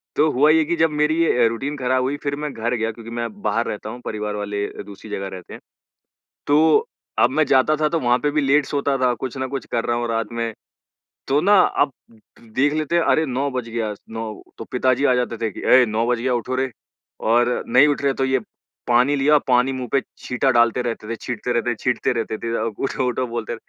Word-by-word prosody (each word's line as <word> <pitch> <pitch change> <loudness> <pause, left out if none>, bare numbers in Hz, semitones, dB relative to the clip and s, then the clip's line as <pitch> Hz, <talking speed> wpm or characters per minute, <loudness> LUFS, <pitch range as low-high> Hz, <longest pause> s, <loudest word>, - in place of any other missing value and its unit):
तो 155 - +3
हुआ 145 +4 +4
ये 160 0 +4
कि 170 +3 0
जब 160 -1 +3
मेरी 150 +2 +1
अ, 120 -6 +3
रूटीन 135 +6 -3
ख़राब 130 0 +1
हुई 140 +3 -1
फिर 140 0 -1
मैं 150 0 -4
घर 120 +2 -2
गया, 115 -1 -1
क्योंकि 115 +1 -11
मैं 120 0 -2
बाहर 115 +1 0
रहता 105 +1 -5
हूँ 120 +2 -8
परिवार 105 -1 -3
वाले 105 0 -3 0.2
दूसरी 100 +1 -12
जगह 95 -1 -3
रहते 95 -2 -10
हैं, - - -9 0.9
तो 160 - +4 0.3
अब - - +5
मैं 155 -1 +2
जाता 135 +3 +3
था 150 - +3
तो 165 0 0
वहाँ 120 -1 +2
पे 145 - 0
भी 150 0 +1
लेट 140 +1 +3
सोता 140 -1 -1
था, 125 -1 +2
कुछ 130 +2 -6
न 130 0 -2
कुछ 135 -4 -4
कर 115 - 0
रहा 120 - 0
हूँ 120 0 -2
रात 115 -1 -2
में, 115 -1 -3 0.7
तो 140 +2 +3
ना, 200 +1 +5
अब 145 -5 +1 0.5
देख 130 +6 0
लेते 155 +2 -1
हैं 170 - +3
अरे! 160 - +2
9 135 +1 -1
बज 125 -2 -4
गया 115 -2 -2 0.2
9 110 -1 -5 0.2
तो 115 - -7
पिताजी 130 +2 +1
आ 130 - +4
जाते 120 -2 -1
थे 110 0 -1
कि, - - -9
"ऐ 125 -1 +6
9 110 +2 -1
बज 120 -1 +1
गया 125 +2 0
उठो 125 +2 -2
रे।" 130 0 -1 0.5
और 120 +2 +2
नहीं 135 +4 +6
उठ 145 - 0
रहे 140 -1 +1
तो 135 - -1
ये 130 0 +1 0.5
पानी 125 +4 +3
लिया 145 +2 +4
पानी 125 +1 +3
मुँह 130 -1 -4
पे 135 - +3 0.2
छींटा 125 +2 0
डालते 120 0 +3
रहते 115 -3 -4
थे, 115 - -2
छींटते 125 +2 -4
रहते 120 0 0
छींटते 125 -2 0
रहते 110 -1 -3
थे 115 +1 -4
अ, - - -2 0.2
उठो-उठो 130 -1 -1
बोलते। 115 0 -4
125 Hz, 230 wpm, -21 LUFS, 115-140 Hz, 0.9 s, ऐ